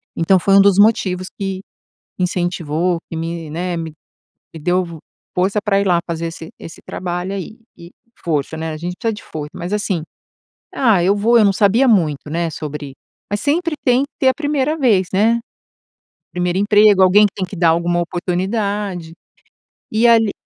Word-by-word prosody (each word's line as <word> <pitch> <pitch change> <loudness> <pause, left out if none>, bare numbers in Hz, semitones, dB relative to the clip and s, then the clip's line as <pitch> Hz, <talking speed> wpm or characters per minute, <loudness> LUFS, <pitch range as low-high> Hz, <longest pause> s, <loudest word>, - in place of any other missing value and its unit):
Então 185 +3 +3
foi 195 +2 +3
um 195 - +8
dos 200 -1 +4
motivos 190 -4 +2
que, 195 -1 -4 0.6
incentivou, 175 -1 -1
que - - -6
me, 165 -1 -5
né, 175 +3 -3
me 165 -2 -5 0.6
me 165 - -8
deu 180 +4 +1
vo 165 -2 -10 0.4
força 190 +3 +1
pra 200 -3 +2
ir 200 - -1
lá 175 -2 +3
fazer 165 -1 -3
esse 165 0 -8
esse 165 - -10
trabalho 180 +1 -4
aí 200 +3 -6 0.2
e 170 +1 -13 0.3
força, 155 -2 -1
né, 160 0 -4
a 155 - -5
gente 175 +3 -4
precisa 225 -2 -1
de 205 - -10
foi 150 -2 -6
mas 175 +2 -6
assim, 205 -5 -1 0.7
ah, 220 -9 +3
eu 195 +3 +3
vou, 230 +4 +4
eu 220 - +5
não 200 - +4
sabia 210 +7 +3
muito, 160 - +1
né, 165 +2 -2
sobre, 150 -2 -6 0.4
mas 205 0 -1
sempre 330 +3 0
tem 250 +1 +3
que - - -12
ter 265 - +4
a 260 - +3
primeira 295 0 -1
vez, 215 - +2
né? 225 +4 +2 0.9
1º 180 0 -1
emprego, 205 -1 +5
alguém 190 +3 +6
que 200 - -6
tem 190 - -3
que 190 - -9
dar 170 -1 +3
alguma 170 +1 +1
oportunidade. 185 0 -3 0.8
E 225 +2 +3
ali 225 -3 +4
185 Hz, 180 wpm, -18 LUFS, 170-210 Hz, 0.9 s, um